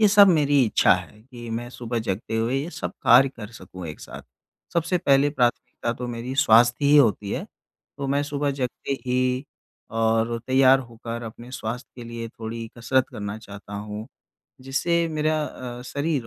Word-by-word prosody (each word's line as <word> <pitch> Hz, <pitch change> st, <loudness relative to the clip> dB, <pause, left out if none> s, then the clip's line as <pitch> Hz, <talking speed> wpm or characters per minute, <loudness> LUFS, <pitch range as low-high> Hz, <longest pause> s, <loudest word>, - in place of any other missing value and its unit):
ये 215 Hz, -, +6 dB
सब 200 Hz, 0 st, +8 dB
मेरी 145 Hz, -5 st, +4 dB
इच्छा 110 Hz, -, +4 dB
है 105 Hz, -, -8 dB
कि 120 Hz, -1 st, -10 dB
मैं 120 Hz, +2 st, -3 dB
सुबह 120 Hz, -1 st, -4 dB
जगते 110 Hz, +3 st, -2 dB
हुए 115 Hz, +3 st, 0 dB
ये 155 Hz, +5 st, -5 dB
सब -, -, -5 dB
कार्य 130 Hz, +3 st, +7 dB
कर 115 Hz, -5 st, -9 dB
सकूँ 90 Hz, -4 st, -9 dB
एक 75 Hz, -, -8 dB
साथ। 70 Hz, -, -9 dB, 0.5 s
सबसे 170 Hz, +2 st, +1 dB
पहले 140 Hz, -3 st, +3 dB
प्राथमिकता 120 Hz, -3 st, 0 dB
तो 125 Hz, +1 st, -6 dB
मेरी 120 Hz, +2 st, -5 dB
स्वास्थ्य 120 Hz, -1 st, +5 dB
ही 145 Hz, +1 st, +6 dB
होती 105 Hz, -7 st, +3 dB
है, -, -, -2 dB, 0.5 s
तो 140 Hz, -, -2 dB
मैं 140 Hz, +1 st, +1 dB
सुबह 145 Hz, 0 st, -1 dB
जगते 135 Hz, 0 st, -3 dB
ही 125 Hz, +1 st, +1 dB, 0.5 s
और 115 Hz, +1 st, +1 dB
तैयार 130 Hz, 0 st, +6 dB
होकर 115 Hz, -1 st, -7 dB
अपने 120 Hz, +2 st, -9 dB
स्वास्थ्य 120 Hz, -1 st, -5 dB
के 120 Hz, -, -8 dB
लिए 115 Hz, 0 st, -5 dB
थोड़ी 115 Hz, 0 st, -6 dB
कसरत 130 Hz, +2 st, +1 dB
करना 105 Hz, 0 st, -5 dB
चाहता 100 Hz, -1 st, -11 dB
हूँ 105 Hz, +1 st, -6 dB, 0.5 s
जिससे 165 Hz, +6 st, 0 dB
मेरा 155 Hz, 0 st, 0 dB
अ, 125 Hz, -3 st, -7 dB
शरीर 145 Hz, -1 st, -2 dB
125 Hz, 175 wpm, -24 LUFS, 115-140 Hz, 0.5 s, सब